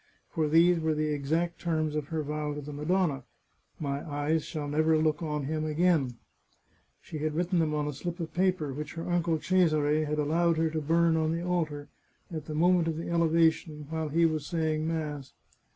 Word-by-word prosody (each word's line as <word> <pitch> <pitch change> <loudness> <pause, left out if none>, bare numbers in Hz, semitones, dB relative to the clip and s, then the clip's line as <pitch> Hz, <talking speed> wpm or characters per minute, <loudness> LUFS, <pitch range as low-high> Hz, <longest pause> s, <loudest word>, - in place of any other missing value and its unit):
For 155 -2 0
these 170 +2 +5
were 160 -1 0
the 155 0 0
exact 160 +4 -1
terms 155 -3 0
of 150 -2 -2
her 160 0 -2
vow 150 0 -3
to 150 - -5
the 145 +1 -8
Madonna: 150 -2 0 0.3
" - - -41
My 140 +1 -2
eyes 145 +2 0
shall 150 -2 -5
ner>er 155 +2 +2
look 155 -1 +1
on 150 -3 -2
him 155 +2 -2
again" 155 -5 +1 0.9
She 155 - -7
had 155 0 -2
written 175 +1 +1
them 155 -2 +1
on 150 -1 -1
a 150 - -3
slip 175 +6 -5
of 165 -2 -5
paper 180 -6 +1
which 150 +2 -6
her 165 - -5
uncle 170 -2 +1
Cesare 155 -4 +2
had 150 0 -2
allowed 165 +3 +2
her 160 0 +1
to 160 0 -2
burn 165 +2 +3
on 160 0 +1
the 170 +1 -3
altar, 155 -5 -1 0.5
at 155 -2 -5
the 155 - -5
moment 175 +1 +3
of 160 -1 -1
the 170 +1 -4
elevation, 160 -2 +2
while 160 -1 -2
he 165 +3 +3
was 155 -2 0
saying 160 -2 -1
mass. 150 -4 -4
155 Hz, 200 wpm, -29 LUFS, 150-165 Hz, 0.9 s, these